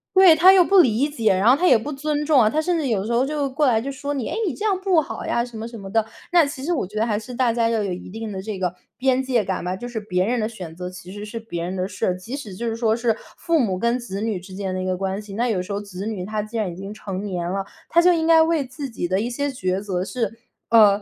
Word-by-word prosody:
对， 375 -4 +8
他 355 +4 +8
又 380 -2 +7
不 390 +2 +5
理 255 -3 +4
解， 230 -9 +2
然 190 +4 +2
后 255 - +7
他 355 +5 +2
也 - - +7
不 275 +7 -5
尊 300 +1 -2
重 295 -4 +5
啊， 215 - +4
他 305 - 0
甚 350 +2 0
至 305 -4 -1
有 220 -6 +1
的 - - -5
时 235 - -1
候 240 +2 +3
就 290 0 -1
过 290 +2 +1
来 230 -3 +4
就 275 +4 -4
说 285 +1 -4
你： 265 -5 -3
“诶， - - -2
你 - - -1
这 420 - -5
样 395 -3 +1
不 380 -4 +3
好 - - -6
呀”， 235 - +1
什 240 -2 -10
么， 220 +1 -5
什 235 0 -9
么 195 -1 -8
的。 225 0 +2 0.3
那 340 -3 +6
其 280 -2 -6
实 345 +5 0
我 290 - 0
觉 210 +3 -8
得， 220 - +2
还 210 -2 0
是 250 +3 -9
大 245 -2 +2
家 230 -1 +2
要 225 -1 +1
有 195 - -2
一 180 - -8
定 220 +3 -6
的 190 -1 -5
这 200 -1 -5
个 180 -1 -1 0.2
边 260 0 +2
界 250 -4 +1
感 190 - -2
吧， 180 +1 -2
就 240 +6 -7
是 240 -2 -4
别 185 -3 0
人 245 +4 0
的 215 0 -1
选 180 -8 -9
择 180 +1 -5
其 185 0 -10
实 205 0 -7
是 230 +2 -6
别 220 -7 -5
人 180 +2 -3
的 185 0 -1
事 - - -3
儿。 180 - 0
即 225 +9 -6
使 270 -9 -7
就 235 +5 -4
是 225 - -1
说 225 -1 +1
是， 230 -1 +1 0.2
父 335 -1 +1
母 195 -8 0
跟 235 +3 +1
子 225 -6 -6
女 220 -3 -1
之 185 +2 -12
间 190 -1 -3
的 185 - -2
一 - - -3
个 185 0 -1
关 195 +1 -2
系， 205 -2 -10
那 240 +3 +1
有 205 -6 0
时 185 - -7
候 200 - -1
子 200 -1 -7
女 210 -5 -3
他 215 +1 -2
既 215 +2 -6
然 215 -4 0
已 - - -9
经 195 +3 -7
成 195 -2 -5
年 180 -4 -3
了， 195 +1 -2 0.2
他 340 - +5
就 360 +1 +6
应 325 -1 0
该 325 -1 +7
为 320 -3 +2
自 260 +2 -6
己 225 -6 -3
的 190 +3 +1
一 235 - -2
些 285 +4 -2
抉 185 -8 -1
择 190 -3 -2
是 225 +1 -3 0.3
呃， 210 -3 +6
225 Hz, 345 characters per minute, -22 LUFS, 195-275 Hz, 0.3 s, 对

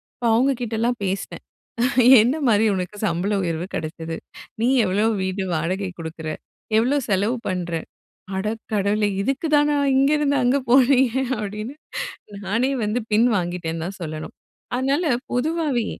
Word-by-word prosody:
அப்ப 245 - -6
அவங்க 265 +4 +3
கிட்டலாம் 235 +1 -1
பேசினேன். 190 +1 -3 0.8
"என்ன 250 +6 +2
மாதிரி 215 0 +4
உனக்கு 185 +2 -4
சம்பள 190 +3 0
உயர்வு 170 +1 -2
கிடைச்சது? 160 +1 -5 0.4
நீ 240 - +3 0.2
எவ்வளோ 200 +4 +1 0.2
வீடு 190 +1 -2
வாடகை 185 +4 -1
கொடுக்குற? 160 -1 -6 0.5
எவ்வளோ 260 +6 +3
செலவு 205 +6 +1
பண்ற? 180 -2 -3 0.7
அட 190 - -2 0.3
கடவுளே 205 +1 +1
இதுக்குதானா 295 +2 +2 0.2
இங்கேருந்து 285 +1 +3
அங்க 260 +3 +3
போனீங்க" 260 -1 +5 0.3
அப்படின்னு 210 +5 -5 0.7
நானே 245 +6 +1
வந்து 215 +4 0
பின் 230 +3 +5
வாங்கிட்டேன்னு 170 -2 -3
தான் 195 +1 -7
சொல்லணும்! 155 -1 -6 0.4
அதனால 275 +7 +1 0.3
பொதுவாகவே 280 -3 0
215 Hz, 125 wpm, -22 LUFS, 185-260 Hz, 0.8 s, போனீங்க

